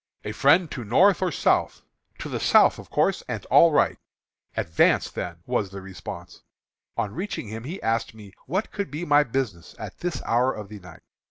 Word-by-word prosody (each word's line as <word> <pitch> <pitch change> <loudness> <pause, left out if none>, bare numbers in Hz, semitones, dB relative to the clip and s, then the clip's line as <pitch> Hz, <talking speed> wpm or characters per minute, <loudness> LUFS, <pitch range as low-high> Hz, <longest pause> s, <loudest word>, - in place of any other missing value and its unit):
"'A 105 - -3
friend 145 - +3
to 120 - -5
North 185 - +4
or 185 -2 +1
South?' - - +1 0.3
"'To - - -6
the - - -3
South, - - +5
of - - -12
course, - - +1
and - - -5
all 170 - +7
right.' 150 - +2 0.6
"'Advance, 80 -1 +2
then,' 85 -1 -6
was 120 -6 -1
the 100 +1 -8
response. 95 -1 -9 0.6
On 100 - -2
reaching 180 - -5
him, 110 +2 -7
he 175 +8 -6
asked 115 0 -1
me 105 -3 -13
what 190 +10 -2
could 200 -7 -4
be 155 +5 -5
my 145 -1 +5
business 115 - -4
at - - -8
this 170 -7 -3
hour 125 +3 +2
of 105 -2 -8
the 105 -1 -9
night. 90 -3 -14
120 Hz, 190 wpm, -25 LUFS, 100-160 Hz, 0.6 s, all